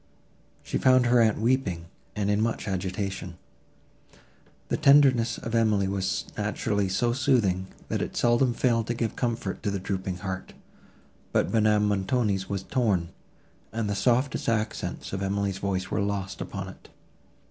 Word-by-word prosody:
She - - -2
found 130 -1 +5
her 120 0 +5
aunt 110 -2 +3
weeping, 110 -8 0 0.3
and 105 -1 0
in 105 +1 +2
much 110 -1 -1
agitation. 95 -1 -3 1.3
The - - +1
tenderness 135 -5 +5
of 115 - -6
Emily 110 -4 +2
was 95 -1 -1
naturally 100 -2 -1
so 120 +5 +1
soothing, 105 -8 +1 0.2
that - - -2
it - - -4
seldom 120 +1 +3
failed 115 -3 +1
to 120 - -1
give 115 -1 -2
comfort 115 -5 -2
to 105 - -1
the 100 - -1
drooping 95 -1 -3
heart: 95 -1 -5 0.8
but - - +1
Madame 105 -1 +3
Montoni's 100 -1 0
was 100 -2 -2
torn, 100 -9 0 0.6
and 110 -1 -2
the 100 - -1
softest 125 +5 +1
accents 110 -3 -2
of 95 - -2
Emily's 100 0 -1
voice 95 -2 -2
were - - 0
lost 100 -1 -3
upon - - -5
it. - - -14
105 Hz, 150 wpm, -27 LUFS, 95-120 Hz, 1.3 s, found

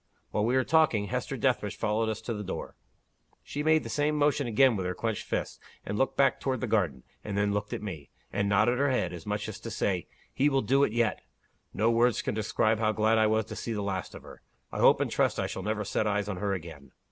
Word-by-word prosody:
While 105 - +1
we 120 +3 +1
were 130 - +3
talking, 130 -12 +2
Hester - - -3
Dethridge - - 0
followed 110 +1 0
us 110 0 -3
to 115 +1 -3
the 105 -1 -5
door. - - -6 0.7
She 145 - -4
made 155 +1 +3
the - - -6
same 150 +1 0
motion 145 -2 +2
again 120 +2 +4
with 95 -2 -2
her 90 - -3
clenched 115 -3 -3
hand, - - -2 0.3
and 105 - -3
looked 135 +5 0
back 140 - +3
toward 130 -2 -1
the - - 0
garden 85 - 0 0.2
and 100 -1 -4
then 100 0 +1
looked 105 0 -2
at - - -4
me, 80 -9 -7 0.2
and 100 0 0
nodded 110 +5 +3
her 140 0 +3
head, 95 -9 0
as 85 +1 -9
much 105 +1 -2
as 110 0 -7
to 115 - -7
say, 95 -5 -1 0.3
'He 145 +2 +3
will 135 -3 +1
do 135 +6 +3
it 140 - +2
yet!' 115 -2 0 0.5
No 115 +2 +2
words 120 0 +2
can - - -1
describe 110 +1 +1
how 110 -1 +2
glad 110 +1 +3
I 110 - +4
was 110 0 +1
to - - -8
see 115 - -4
the 105 -2 -2
last 95 -2 -3
of - - -10
her. - - -13 0.3
I - - -5
hope - - +5
and - - -1
trust - - +1
I - - 0
shall - - -4
never 105 +1 -2
set 105 +2 0
eyes 105 -1 0
on 100 -3 -3
her 100 +1 -1
again!" 80 -6 -8
110 Hz, 250 wpm, -29 LUFS, 100-120 Hz, 0.7 s, hope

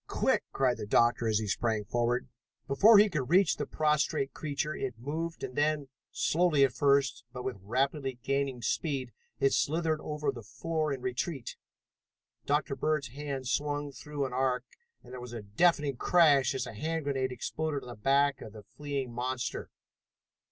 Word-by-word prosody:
Quick!" - - +1
cried 130 -2 +1
the 105 - -6
doctor 120 +1 +3
as 110 -1 +2
he 110 - -1
sprang 110 +1 0
forward. 120 +2 0 0.4
Before 205 +11 +7
he 210 +1 +7
could 150 -10 -3
reach 180 0 +4
the - - -3
prostrate 150 -3 +1
creature 150 0 -3
it 125 -3 -4
moved 160 +7 -4
and 125 - -5
then, 145 -2 +1 0.2
slowly 160 -4 +2
at 135 -2 +3
first, 140 -3 +2
but 125 -1 -7
with 130 -5 -4
rapidly 135 +5 -1
gaining 135 -3 -1
speed, 135 0 -1 0.3
it 135 - +3
slithered 160 0 +1
over 150 -2 -2
the 120 -3 -9
floor 155 +7 -2
in 135 -2 -3
retreat. 130 +1 -3 0.9
Dr. 145 -1 +1
Bird's 155 -4 0
hand 135 0 -5
swung 145 +1 -1
through 140 +2 -4
an 130 - -5
arc, 130 0 0 0.4
and - - -13
there 125 - -7
was 120 -1 -8
a 115 -3 -6
deafening 140 - +2
crash 145 -5 +4
as 130 -1 -2
a 115 - -8
hand 160 +8 -2
grenade 135 -2 -1
exploded 150 +3 -3
on - - -11
the - - -6
back 135 +5 +2
of 105 - -9
the 105 -1 -11
fleeing 140 -1 -5
monster. 125 +1 -3
140 Hz, 175 wpm, -30 LUFS, 125-150 Hz, 0.9 s, Before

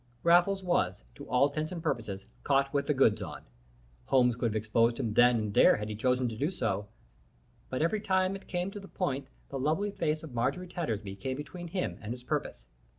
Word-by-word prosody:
Raffles 175 +3 +4
was, 95 - 0
to - - -11
all 125 +3 +4
intents 155 +3 -3
and 170 -3 -5
purposes, 100 -4 -2 0.2
caught 140 0 +2
with 140 0 0
the 150 - +3
goods 130 -5 +4
on. - - -7 0.6
Holmes 125 -3 +4
could 120 0 0
have - - -5
exposed 115 +2 +2
him 110 -3 -1
then 120 +1 +6
and 105 -2 -2
there - - +7
had 105 0 -4
he 105 - -3
chosen 125 +3 +1
to 110 - -6
do 145 +8 0
so, 105 - -2 0.8
but 130 +4 -1
every 205 +6 +1
time 190 -1 +1
it 195 - -10
came 180 +1 -2
to 205 - -7
the 195 - -11
point 140 -9 -2 0.2
the 135 - -4
lovely 160 +10 0
face 155 -4 -1
of 155 -6 -9
Marjorie 125 +10 -1
Tattersby 110 - -3
came 130 +6 -3
between 175 +4 -7
him 180 +2 -3
and 110 +2 -4
his 125 0 -10
purpose. - - -3
135 Hz, 215 wpm, -30 LUFS, 115-175 Hz, 0.8 s, there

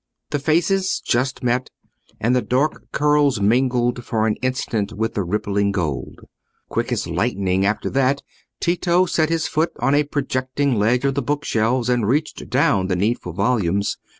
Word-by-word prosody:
The 145 - 0
faces 175 +6 +1
just 130 +2 -1
met, 125 +1 0 0.5
and 120 +3 +2
the 125 - +2
dark 135 +6 -1
curls 145 -4 +2
mingled 120 +3 +1
for 110 -1 0
an 110 -1 +1
instant 125 -5 -2
with 110 +2 -2
the 100 - -1
rippling 100 +2 0
gold. 75 -9 -3 0.5
Quick - - -2
as - - -1
lightning 95 0 0
after 105 - -1
that, 135 +1 +1 0.4
Tito 175 +1 +2
set 160 -3 +1
his 165 -1 0
foot 160 +2 0
on 125 +4 +1
a 145 +1 +4
projecting 140 -1 -1
ledge 120 +4 +2
of 135 - +2
the 140 - -1
book 145 +3 -2
shelves 115 +2 +1
and 120 -4 +1
reached 150 +6 -1
down 95 -1 +2
the 95 - 0
needful 100 -1 -1
volumes. 100 -2 0
125 Hz, 165 wpm, -21 LUFS, 105-145 Hz, 0.5 s, a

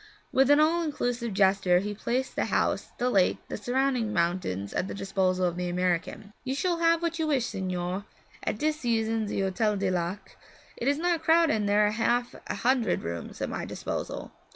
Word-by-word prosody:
With 270 +1 +4
an 290 +1 +6
all 325 +3 +3
inclusive 245 -7 -2
gesture 190 -2 +3
he 205 +3 -1
placed 245 +5 -2
the - - 0
house, - - 0
the 245 - 0
lake, 190 -4 +3
the - - -3
surrounding 245 0 0
mountains, 170 - -1
at 185 - -1
the - - -5
disposal 190 -2 0
of 175 -1 -1
the 180 0 -2
American. 180 +3 -1
'You 260 +1 -2
shall 345 +3 0
have 335 0 +3
what 335 0 -1
you 320 - +1
wish, 270 -6 +2
signore. 185 -1 -3 0.4
At - - -2
dis 305 +4 0
season 225 -3 0
ze 200 - -1
Hotel 205 +3 +1
du 195 -1 0
Lac 180 +2 -3 0.2
' - - -26
'Is 280 +4 +2
not 340 0 +1
crowded, 325 0 +4
and 210 -2 0
there 210 +1 +4
are 210 - +2
half 240 +2 0
a - - -2
hundred 245 -1 +1
rooms 85 0 -5
at - - -2
my - - -3
disposal? - - -5
215 Hz, 200 wpm, -28 LUFS, 185-270 Hz, 0.4 s, an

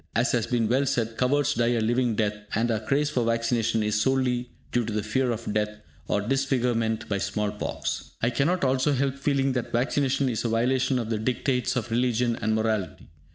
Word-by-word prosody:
As 115 +4 +2
has 120 -3 0
been 120 -2 +1
well 130 +4 +2
said, 115 -4 -1
cowards 140 +3 +2
die 120 +1 +1
a - - +1
living 120 +1 +1
death, 105 -1 +1 0.2
and 115 +2 +1
our 110 - 0
craze 140 +7 0
for 125 - +1
vaccination 115 -1 +1
is 105 0 +1
solely 125 -1 +1 0.2
due 120 - +1
to 110 - -4
the 105 -1 -1
fear 130 +4 0
of 115 -2 -3
death 105 0 +1 0.4
or 100 - +1
disfigurement 120 -2 0
by 100 -1 -1
small 105 +1 -1
pox. 105 - -4
I 115 - +1
cannot 150 +8 +1
also 135 +2 +2
help 135 0 +1
feeling 140 -1 +1
that 125 -2 -3
vaccination 135 +2 +1
is 120 -4 -1
a 120 - 0
violation 125 +3 +1
of 115 -2 -3
the 110 - 0
dictates 125 +2 0
of 120 -1 -2
religion 120 0 +1
and 110 0 +1
morality. 110 -6 -2
120 Hz, 200 wpm, -26 LUFS, 110-130 Hz, 0.4 s, As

